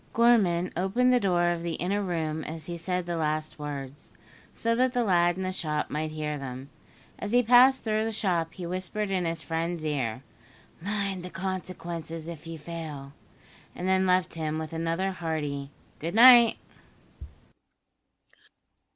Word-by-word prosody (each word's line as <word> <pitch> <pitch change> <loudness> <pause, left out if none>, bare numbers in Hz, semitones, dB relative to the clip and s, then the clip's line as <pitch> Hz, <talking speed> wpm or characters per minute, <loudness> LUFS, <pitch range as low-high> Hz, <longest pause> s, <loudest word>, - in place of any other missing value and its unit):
Gorman 200 -7 +3
opened 220 +9 +2
the 250 - +5
door 175 -4 +2
of 170 -1 -2
the 170 -1 -3
inner 200 +4 -1
room 160 -4 -2
as 160 0 -7
he 175 - -5
said 180 +1 -2
the 175 -1 -3
last 155 -1 -2
words, 145 -1 -7 0.4
so 230 0 0
that 255 +2 +2
the 245 -2 +1
lad 175 -3 +3
in 190 - -3
the 185 - -1
shop 150 -5 -2
might 155 +1 -2
hear 150 -1 -4
them. 130 +1 -7 0.5
As 205 +2 -4
he 245 0 +5
passed 250 +3 +6
through 215 -1 0
the 225 - -1
shop 175 -6 -1
he 180 - -6
whispered 185 +3 -3
in 185 -2 0
his 165 -1 -3
friend's 165 0 -3
ear, 130 -5 -2 0.6
"Mind 200 -1 -2
the 180 - -6
consequences 175 -4 -5
if 165 -2 -8
you 165 0 -6
fail," 150 -3 -7 0.6
and 180 - -4
then 190 0 +3
left 180 -2 +2
him 155 -1 -3
with 160 0 -5
another 165 +4 -1
hearty 150 -6 -3 0.3
good 165 +5 -4
night. 240 -1 +8
175 Hz, 160 wpm, -27 LUFS, 155-195 Hz, 0.6 s, night